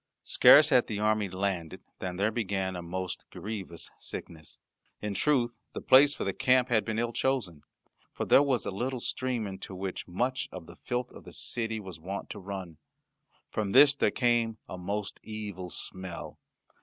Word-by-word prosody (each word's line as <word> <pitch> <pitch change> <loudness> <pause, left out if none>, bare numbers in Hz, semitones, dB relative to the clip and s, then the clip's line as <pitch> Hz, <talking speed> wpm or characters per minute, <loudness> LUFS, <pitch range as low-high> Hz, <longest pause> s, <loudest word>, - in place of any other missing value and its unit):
Scarce 150 +1 +7
had 125 -5 +4
the 105 - -3
army 105 -1 +1
landed 95 -3 -3 0.2
than 90 -1 -4
there 100 +4 +1
began 95 -4 -1
a 90 - -4
most 90 +1 -5
grievous 95 -5 -6
sickness. 80 -3 -7 0.4
In 105 -1 -3
truth 120 -1 +1
the - - -4
place 140 +2 +7
for - - -4
the - - -1
camp 130 -1 +3
had 110 -3 +3
been 110 +1 -3
ill 120 0 0
chosen, 115 - -1 0.5
for - - -3
there - - +7
was 135 -7 +1
a - - -2
little 125 +6 -2
stream 125 -1 -1
into 95 -1 -7
which 95 0 -5
much 125 +9 -1
of 90 -3 -8
the - - -13
filth 125 0 -3
of - - -12
the - - -11
city 115 -2 -1
was 95 -5 -9
wont 95 +5 -6
to - - -6
run. 95 -5 -7 0.7
From 105 -3 -2
this 140 +2 +8
there 145 - +2
came 120 -3 +1
a - - -6
most 100 +3 -4
evil 105 -4 -6
smell. 95 0 -5
105 Hz, 180 wpm, -29 LUFS, 95-120 Hz, 0.7 s, this